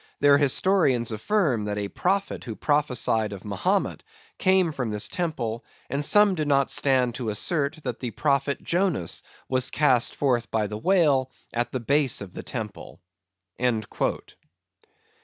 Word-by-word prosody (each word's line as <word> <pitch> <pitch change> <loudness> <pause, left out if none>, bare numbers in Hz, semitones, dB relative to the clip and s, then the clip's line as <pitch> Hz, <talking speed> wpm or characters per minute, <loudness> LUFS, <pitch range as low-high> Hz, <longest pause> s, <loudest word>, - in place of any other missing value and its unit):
Their 145 0 +5
Historians 140 - +2
affirm, 125 - 0
that 105 0 -3
a 100 -1 -2
Prophet 195 - -2
who 115 -4 -6
prophesy'd 125 -7 0
of 100 0 -10
Mahomet, 100 -3 -1 0.4
came 185 -3 +3
from 125 -6 -3
this 105 -1 +1
Temple, 120 -10 -3 0.3
and 140 +2 -1
some 205 +5 +5
do 155 -4 -1
not 140 -2 +2
stand 130 -3 +2
to 120 -2 -4
assert, 145 - -1
that 125 -3 -4
the 125 - -3
Prophet 140 +2 0
Jonas 175 - 0 0.3
was 130 -1 +1
cast 130 -6 +2
forth 125 -5 0
by 110 -1 0
the 105 +1 -5
Whale 145 - +2 0.2
at 120 0 -1
the 130 - -2
Base 140 +2 +1
of 95 -3 -8
the - - -6
Temple." 110 -5 -7
130 Hz, 145 wpm, -25 LUFS, 115-150 Hz, 0.4 s, Their